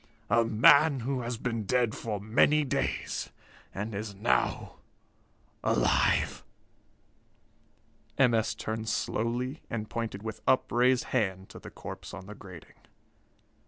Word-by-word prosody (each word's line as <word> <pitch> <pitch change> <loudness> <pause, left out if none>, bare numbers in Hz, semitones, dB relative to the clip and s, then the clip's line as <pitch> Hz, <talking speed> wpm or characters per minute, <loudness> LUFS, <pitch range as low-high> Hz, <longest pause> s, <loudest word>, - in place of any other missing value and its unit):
A 115 +1 +5
man 135 +6 +5
who 130 +1 -2
has 120 0 -3
been 115 -1 -2
dead 120 0 +1
for 105 -3 -4
many 120 +9 +3
days, 135 - -2 0.4
and 105 +3 -5
is 100 0 -5
now 105 +5 0 0.9
alive!" - - +2 1.7
M. 125 -3 +4
S. 110 -1 +1
turned 110 +1 -4
slowly 120 +6 -2
and 110 -2 -4
pointed 115 -3 -4
with 110 -1 -6
upraised 125 0 +3
hand 95 -6 -1
to - - -11
the - - -10
corpse - - -9
on 95 -1 -9
the 105 - -9
grating. 95 -5 -13
115 Hz, 125 wpm, -29 LUFS, 105-125 Hz, 1.7 s, A